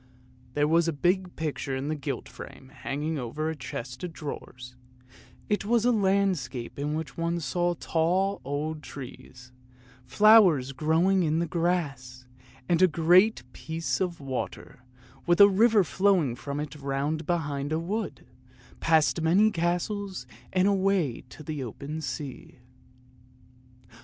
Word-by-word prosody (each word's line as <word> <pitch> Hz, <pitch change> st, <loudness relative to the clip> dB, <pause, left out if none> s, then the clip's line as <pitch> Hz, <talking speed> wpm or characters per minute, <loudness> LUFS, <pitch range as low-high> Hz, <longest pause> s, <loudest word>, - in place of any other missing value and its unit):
There 145 Hz, 0 st, +2 dB
was 165 Hz, +2 st, +3 dB
a 165 Hz, -, 0 dB
big 180 Hz, +4 st, 0 dB
picture 150 Hz, -4 st, -3 dB
in 135 Hz, +3 st, -3 dB
a -, -, -1 dB
gilt 140 Hz, -1 st, -5 dB
frame 130 Hz, -, -11 dB
hanging 150 Hz, +2 st, -3 dB
over 140 Hz, +6 st, -3 dB
the -, -, -5 dB
chest 125 Hz, -1 st, -7 dB
of 180 Hz, -, -4 dB
drawers; 125 Hz, -5 st, -8 dB, 0.7 s
it 210 Hz, -, 0 dB
was 230 Hz, +2 st, +2 dB
a 245 Hz, -, +5 dB
landscape 190 Hz, -, 0 dB
in 150 Hz, +1 st, -1 dB
which 155 Hz, -3 st, -5 dB
one 170 Hz, +1 st, -1 dB
saw 175 Hz, +4 st, 0 dB
tall, 185 Hz, +5 st, 0 dB
old 150 Hz, +3 st, -3 dB
trees, 130 Hz, -2 st, -11 dB, 0.6 s
flowers 195 Hz, -, +6 dB
growing 165 Hz, +7 st, +2 dB
in 160 Hz, -2 st, +1 dB
the 170 Hz, -, +1 dB
grass, 145 Hz, -7 st, -2 dB, 0.4 s
and 175 Hz, 0 st, +2 dB
a 185 Hz, -, +7 dB
great 175 Hz, -, +4 dB
piece 165 Hz, +3 st, -3 dB
of 175 Hz, -2 st, -2 dB
water, 135 Hz, -2 st, -5 dB, 0.5 s
with 175 Hz, +2 st, +3 dB
a 200 Hz, -, +10 dB
river 210 Hz, +1 st, +4 dB
flowing 180 Hz, -8 st, +2 dB
from 140 Hz, +3 st, -5 dB
it 150 Hz, -1 st, -5 dB
round 145 Hz, +3 st, -2 dB
behind 145 Hz, -4 st, -2 dB
a 155 Hz, -, +1 dB
wood, 200 Hz, +6 st, -4 dB, 0.5 s
past 160 Hz, 0 st, +3 dB
many 190 Hz, +7 st, +4 dB
castles 180 Hz, +3 st, -2 dB, 0.3 s
and 185 Hz, +1 st, +3 dB
away 195 Hz, -9 st, +1 dB
to 155 Hz, -, -12 dB
the 150 Hz, -2 st, -4 dB
open 140 Hz, +7 st, -6 dB
sea. 135 Hz, -1 st, -6 dB
160 Hz, 140 wpm, -27 LUFS, 140-185 Hz, 0.7 s, a